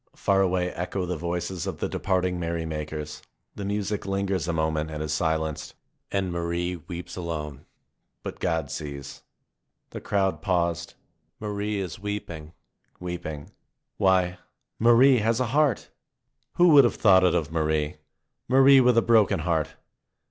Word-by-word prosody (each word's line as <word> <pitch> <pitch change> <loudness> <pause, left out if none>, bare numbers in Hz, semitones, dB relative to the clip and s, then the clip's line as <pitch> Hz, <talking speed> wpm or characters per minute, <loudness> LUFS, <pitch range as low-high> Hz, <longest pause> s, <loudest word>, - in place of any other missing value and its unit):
Far 95 -1 +2
away 90 -1 +1
echo 90 +2 -3
the 90 0 -3
voices 85 +2 -3
of - - -4
the - - -2
departing 90 -2 -1
merry 85 -1 -2
makers. 75 -1 -5 0.3
The 100 - -7
music 100 0 -2
lingers 95 -3 -1
a - - +1
moment 80 -1 -1
and 75 0 -4
is 75 - -2
silenced. 80 -1 -2 0.4
And 95 -2 -1
Marie 85 +1 -2
weeps 85 +1 -8
alone. 75 -5 -5 0.6
But - - -6
God 80 -4 -1
sees. 70 -2 -7 0.7
The - - -7
crowd 95 -2 0
paused. 85 -3 -1 0.4
Marie 105 0 -3
is 90 -4 -5
weeping, 85 -6 -6 0.5
weeping. 85 -5 -6 0.5
Why, 90 -2 +2 0.4
Marie 120 +3 +6
has 115 +2 +1
a 130 - +1
heart! 145 -6 +1 0.6
Who 175 0 +5
would 145 -3 +8
have 120 - +1
thought 95 -4 +5
it 90 -1 +3
of 80 -3 -1
Marie? 80 -2 0 0.5
Marie 135 +1 +7
with 125 -2 +4
a 115 - +5
broken 110 -8 +3
heart! 80 -2 -1
90 Hz, 145 wpm, -26 LUFS, 80-100 Hz, 0.7 s, would